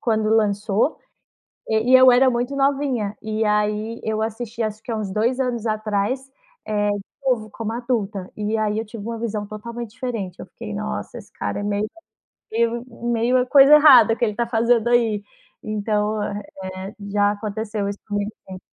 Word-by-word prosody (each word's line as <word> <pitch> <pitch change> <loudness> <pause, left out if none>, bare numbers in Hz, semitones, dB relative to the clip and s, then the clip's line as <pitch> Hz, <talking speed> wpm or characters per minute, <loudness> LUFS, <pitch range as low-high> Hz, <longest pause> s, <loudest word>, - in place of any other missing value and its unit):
quando 220 -2 +1
lançou, 210 +3 +1 0.7
eh, 220 0 +2
e 255 +2 +6
eu 255 0 +8
era 255 +2 +5
muito 245 +3 -2
novinha 270 -7 0
e 220 0 -1
aí 210 +2 0
eu 220 0 -1
assisti 225 +1 -4
acho 215 0 -3
que 235 - -6
há 225 - -1
uns 205 -3 -3
2 235 +6 0
anos 240 -3 -1
atrás, 215 +5 -1 0.4
eh, 205 -1 +1
de 205 - -2 0.3
novo, 225 -5 +1
como 225 0 -4
adulta, 220 -6 -2
e 210 +1 -1
aí 215 0 0
eu 225 - -4
tive 215 -1 -9
uma 230 0 -5
visão 215 -2 -3
totalmente 235 +2 -7
diferente, 230 -8 -5
eu - - -7
fiquei: - - -8
"Nossa, 65 0 -4
esse - - -12
cara 100 - -3
é - - -4
meio 205 +1 0 0.7
meio 235 +2 0 0.3
meio 245 +2 +2
coisa 280 +2 +8
errada 260 -7 +8
o - - -5
que - - +2
ele 210 -2 -2
tá 235 0 -1
fazendo 235 0 +2
aí". 225 -4 +2 0.4
Então, 210 0 -1
eh, 195 -1 -6 0.2
já 205 0 +2
aconteceu 210 0 -3
isso 200 - -6
comigo 205 0 -2 0.2
sim. 185 -1 -7
220 Hz, 180 wpm, -22 LUFS, 210-240 Hz, 0.7 s, eu